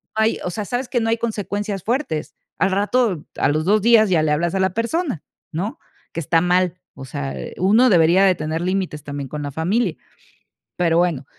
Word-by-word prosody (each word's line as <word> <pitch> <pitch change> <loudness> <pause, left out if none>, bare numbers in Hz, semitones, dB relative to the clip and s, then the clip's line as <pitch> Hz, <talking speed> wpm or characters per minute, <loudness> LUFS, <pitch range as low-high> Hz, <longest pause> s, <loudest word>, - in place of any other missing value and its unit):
ay, 220 +1 +2
o - - -1
sea, 205 +4 -4
sabes 245 +2 -3
que 245 - +1
no 225 0 0
hay 230 - +2
consecuencias 205 -3 -3
fuertes. 230 - -2 0.2
Al 190 +2 +2
rato, 205 -3 +1
a - - +2
los 155 +2 0
2 210 +1 +3
días 225 -3 +5
ya 160 -4 +3
le 150 - +1
hablas 170 +4 0
a - - +1
la 190 -1 +1
persona, 235 - -1 0.3
¿no? 185 +8 -4 0.3
Que 170 - -4
está 165 +1 +2
mal, 180 0 +1 0.2
o 135 - -9
sea, 70 - -5
eh, - - -7
uno 220 +7 +5
debería 175 +2 +5
de 185 - +5
tener 155 +2 -3
límites 185 -5 -2
también 145 -1 -5
con 150 -1 -5
la 145 - -4
familia. 185 - 0 0.8
Pero 170 -2 +2
bueno, 160 -7 0
185 Hz, 205 wpm, -21 LUFS, 160-220 Hz, 0.8 s, días